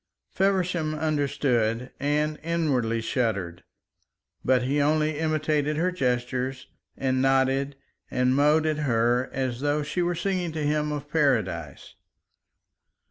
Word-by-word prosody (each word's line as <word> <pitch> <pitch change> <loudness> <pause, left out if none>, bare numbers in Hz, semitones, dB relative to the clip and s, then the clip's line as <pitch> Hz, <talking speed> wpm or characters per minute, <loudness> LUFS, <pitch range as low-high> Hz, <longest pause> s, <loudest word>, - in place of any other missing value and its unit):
Feversham 180 -5 0
understood 135 -6 0
and 150 +2 0
inwardly 140 -9 0
shuddered, 100 -8 -2 0.8
but 130 -1 +3
he 140 +3 +1
only 155 +1 +1
imitated 155 -1 0
her 180 +3 +1
gestures 125 -3 -2 0.3
and 130 -1 0
nodded 135 +1 +2 0.3
and 125 +1 +1
mowed 150 +3 +4
at 155 -1 0
her 120 -2 +1
as 130 -2 -2
though 145 +1 +1
she 150 +5 -2
was 175 -1 -1
singing 185 -3 -1
to 155 -1 -3
him 150 0 0
of 145 -1 -4
Paradise. 110 - -1
145 Hz, 120 wpm, -26 LUFS, 125-155 Hz, 0.8 s, mowed